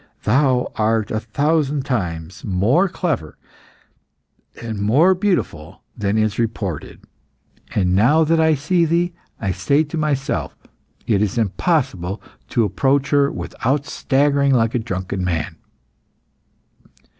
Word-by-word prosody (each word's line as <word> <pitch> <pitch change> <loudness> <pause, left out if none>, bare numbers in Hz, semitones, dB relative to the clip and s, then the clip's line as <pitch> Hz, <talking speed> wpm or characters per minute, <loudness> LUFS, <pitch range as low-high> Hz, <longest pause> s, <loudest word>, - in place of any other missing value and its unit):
Thou 130 +1 +2
art 110 -1 +1
a 110 - 0
thousand 145 +4 0
times 90 - -3
more 115 - +2
clever 155 - -3 1.2
and 110 -3 -5
more 140 - +4
beautiful 135 - -2
than 105 -1 -1
is 110 0 0
reported. 105 -8 -3 0.7
And 90 -3 +2
now 135 +11 +4
that 165 +1 +2
I 160 -1 +4
see 170 +5 +1
thee, 170 +2 +1 0.3
I 100 -4 -1
say 140 - +2
to 160 +2 -6
myself, 145 -3 -1 0.5
'It 105 -3 +2
is 105 +1 -1
impossible 105 - 0 0.3
to 115 - +2
approach 135 +7 +1
her 140 -1 +3
without 140 +3 -2
staggering 140 -1 +2
like 115 -1 +2
a 125 - +1
drunken 95 -4 -4
man. 85 -4 -2
120 Hz, 120 wpm, -20 LUFS, 100-150 Hz, 1.2 s, more